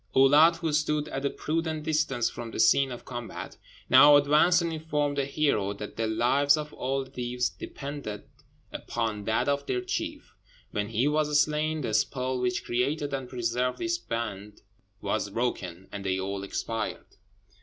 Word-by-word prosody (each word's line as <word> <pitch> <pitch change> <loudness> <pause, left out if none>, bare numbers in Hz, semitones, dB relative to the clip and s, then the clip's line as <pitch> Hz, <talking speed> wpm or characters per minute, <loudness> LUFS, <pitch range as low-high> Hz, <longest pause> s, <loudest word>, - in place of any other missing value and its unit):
Oulâd, 145 +5 +6
who 165 -2 -2
stood 150 0 +1
at 135 +1 -4
a - - -1
prudent 160 0 -2
distance 150 -6 +1
from 120 -1 -6
the - - -7
scene 135 -1 +4
of 120 - -8
combat, 120 -2 -7 0.3
now 145 +3 +8
advanced 150 +5 +5
and 165 -1 -2
informed 150 -2 -1
the 140 -1 0
hero 135 -9 0
that 105 +1 -8
the 115 0 -1
lives 135 +6 +3
of 150 0 -5
all 135 +1 -2
the 130 - -16
Deevs 125 0 -2
depended 140 -7 -6 0.5
upon 110 -3 -3
that 110 +4 +1
of 140 0 0
their 125 - 0
chief. 125 - -4 0.4
When 105 0 -2
he 115 +5 +1
was 150 0 +2
slain, 155 +1 +1
the 115 -5 -3
spell 130 +3 0
which 125 -1 -1
created 140 +4 -1
and 135 -2 -3
preserved 125 0 -1
this 345 0 -1
band 105 - -5 0.4
was 110 -1 -1
broken, 95 -5 -3
and 100 - -6
they 95 -1 0
all 95 +1 -3
expired. 110 +3 -4
130 Hz, 165 wpm, -28 LUFS, 115-150 Hz, 0.5 s, now